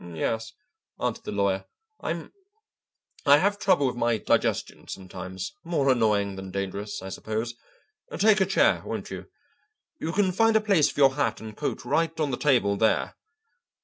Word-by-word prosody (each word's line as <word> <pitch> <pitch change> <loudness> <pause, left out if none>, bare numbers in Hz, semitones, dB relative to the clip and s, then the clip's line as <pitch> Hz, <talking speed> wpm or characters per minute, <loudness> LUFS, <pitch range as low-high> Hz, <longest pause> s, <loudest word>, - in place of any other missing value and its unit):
"Yes," 110 +6 -2 0.5
answered - - -2
the - - -4
lawyer, 100 -1 0 0.3
"I'm - - -4 0.9
I 140 +1 +8
have 205 +5 +1
trouble 180 -8 +3
with 125 - 0
my 120 -1 +1
digestion - - 0
sometimes, 95 - -7
more 145 -6 +2
annoying 105 -5 +1
than 95 0 -7
dangerous, 100 +2 -4
I 95 - -6
suppose. 110 +4 -3 0.6
Take 210 +1 +4
a 190 - +3
chair, 195 - +3
won't - - -5
you? - - -7 0.7
You 160 - -2
can 190 0 +2
find 225 +4 +3
a - - +7
place 200 -8 +3
for - - -3
your 135 -1 +6
hat 145 +1 0
and 110 -1 -9
coat 150 - -3
right 165 0 0
on 150 -3 0
the 125 - -2
table 120 -9 +2
there. 110 +1 +1
125 Hz, 165 wpm, -26 LUFS, 100-165 Hz, 0.9 s, I